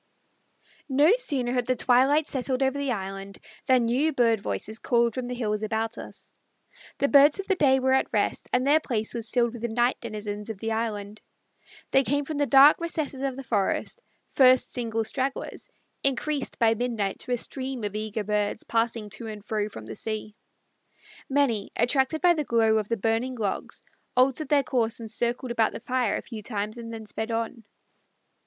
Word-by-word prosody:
No 290 +8 +5
sooner 265 - 0
had 245 -2 0
the 255 - +2
twilight 265 +5 +3
settled 260 -1 -2
over 265 +1 +1
the 280 -2 -1
island 195 -2 -5 0.3
than 255 -3 +4
new 265 +7 +2
bird 235 -5 +2
voices 200 - -4
called 235 -2 +2
from 255 0 -4
the 250 - -4
hills 210 -3 -2
about 220 +1 -2
us. - - -11 0.7
The 280 - +2
birds 285 +4 +6
of 390 - -3
the 390 - +2
day 270 -7 +3
were 260 0 +2
at 265 - +1
rest, - - -1
and 250 +1 +1
their 295 +3 +5
place 225 -7 -3
was 230 -2 -3
filled 240 -2 +1
with 240 - -8
the 235 - -1
night 240 +2 +1
denizens 210 -2 -6
of 220 - -5
the 225 +3 -3
island. 215 -2 -3 0.7
They 270 - +5
came 285 +2 0
from 305 +1 -4
the 285 - +2
dark 275 +4 +7
recesses 310 -5 -3
of 270 -2 -2
the 270 - -7
forests, 220 - -1 0.3
first 255 -1 +5
single 225 -2 -1
stragglers, 265 +4 -3 0.3
increased 275 +1 -1
by 225 -2 +4
midnight 225 -4 -2
to - - -5
a - - +1
stream 260 0 -4
of 205 -1 -3
eager 215 0 -3
birds, 210 +1 -1
passing 225 -2 -1
to 230 - -5
and 210 -1 -8
fro 210 -1 -2
from 110 - -10
the 110 - -7
sea. 215 - -5 0.9
Many, 265 -7 +1
attracted 265 +5 +1
by 355 -1 +6
the 310 -3 -1
glow 225 -4 +3
of 210 - -5
the 230 - 0
burning 225 +5 -1
logs, 210 -5 -4 0.3
altered 265 +3 +3
their 285 -2 +4
course 240 -7 -1
and 225 -2 -6
circled 240 +2 -1
about 230 -2 +1
the - - -6
fire 250 -2 0
a - - -7
few 225 -3 -8
times 210 0 -4
and 230 -1 -7
then 225 -1 -7
sped 220 +1 -4
on. 230 0 -3
235 Hz, 190 wpm, -26 LUFS, 220-265 Hz, 0.9 s, dark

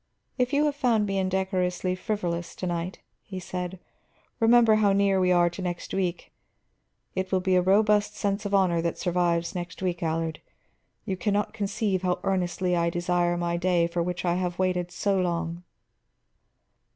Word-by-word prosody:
"If 250 +1 +1
you 290 +1 +3
have 295 -1 0
found 240 -7 +2
me 195 -1 -1
indecorously 185 -1 0
frivolous 185 -4 -3
to - - -5
night," 175 +1 -3 0.2
he 190 -2 -7
said, 180 0 -5 0.6
"remember 225 -1 +5
how 205 -2 +3
near 195 -1 +3
we 180 -1 +3
are 175 -1 +5
to 180 - -7
next 175 -1 -4
week. 180 -2 -2 0.8
It 190 0 -3
will 190 - +3
be 185 0 +1
a 180 - +5
robust 210 +2 +3
sense 200 +1 -1
of 205 - -4
honor 180 -4 +3
that 170 0 -2
survives 170 -1 0
next 175 -2 -6
week, 175 -2 -1
Allard. 160 -1 -2 0.6
You 195 -3 -2
can 200 +3 0
not 205 +1 -1
conceive 205 -2 -1
how 180 -1 0
earnestly 180 -1 0
I 170 0 +2
desire 175 0 0
my 170 0 -1
day 175 -1 +2
for 170 0 -2
which 175 +1 -3
I 175 0 +1
have 180 -1 -2
waited 180 -1 0
so 195 +1 0
long." 170 -1 -2
185 Hz, 175 wpm, -26 LUFS, 175-200 Hz, 0.8 s, remember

